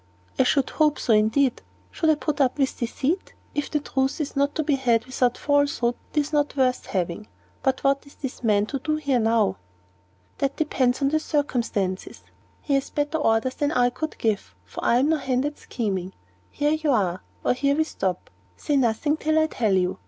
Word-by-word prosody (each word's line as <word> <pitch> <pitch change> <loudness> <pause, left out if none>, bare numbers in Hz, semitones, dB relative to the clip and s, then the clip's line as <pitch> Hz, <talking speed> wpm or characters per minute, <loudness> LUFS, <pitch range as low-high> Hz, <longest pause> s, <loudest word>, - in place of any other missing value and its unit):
"I - - +7
should 270 +1 +1
hope 305 -2 +2
so, 230 - +1
indeed. 220 +5 +2 0.3
Should 320 - 0
I 310 - +5
put 295 -1 -2
up 260 0 +2
with 270 -2 0
deceit? 270 +9 -2 0.2
If 290 - -2
the 300 - 0
truth 270 -1 -1
is 295 -2 -3
not 280 +1 +1
to 315 - 0
be 295 0 +1
had 240 -4 +2
without 250 -1 0
falsehood, 285 -4 +1 0.2
it - - +4
is 290 +2 -6
not 290 -1 +1
worth 255 -1 +1
having. 180 +2 -2 0.3
But 265 -1 0
what 275 +1 +1
is 280 - -16
this 265 -2 -6
man 210 -2 +3
to 275 +5 -4
do 305 +3 -1
here 280 -5 +1
now?" 225 - +2 0.8
"That 275 0 0
depends 270 -3 +1
upon 295 +3 +2
circumstances. 235 -11 -2 0.4
He 285 - -1
has 275 0 +1
better 295 +2 -1
orders 225 -1 +2
than 290 +2 -1
I 245 -3 +3
could 310 +5 -5
give, 210 - -1
for 90 - -8
I 235 - +4
am 270 +4 +3
no 320 - +3
hand 260 -1 0
at 295 0 -4
scheming. 195 -5 -3 0.4
Here 295 +1 +1
we 305 - +2
are; 185 -8 +1 0.2
or - - +3
here 280 +2 +1
we 315 - +3
stop. 190 - -3 0.3
Say 290 - 0
nothing 265 +5 +1
till 315 0 +1
I 315 - +5
tell 225 -9 0
you. 185 -1 +1
270 Hz, 200 wpm, -24 LUFS, 230-295 Hz, 0.8 s, I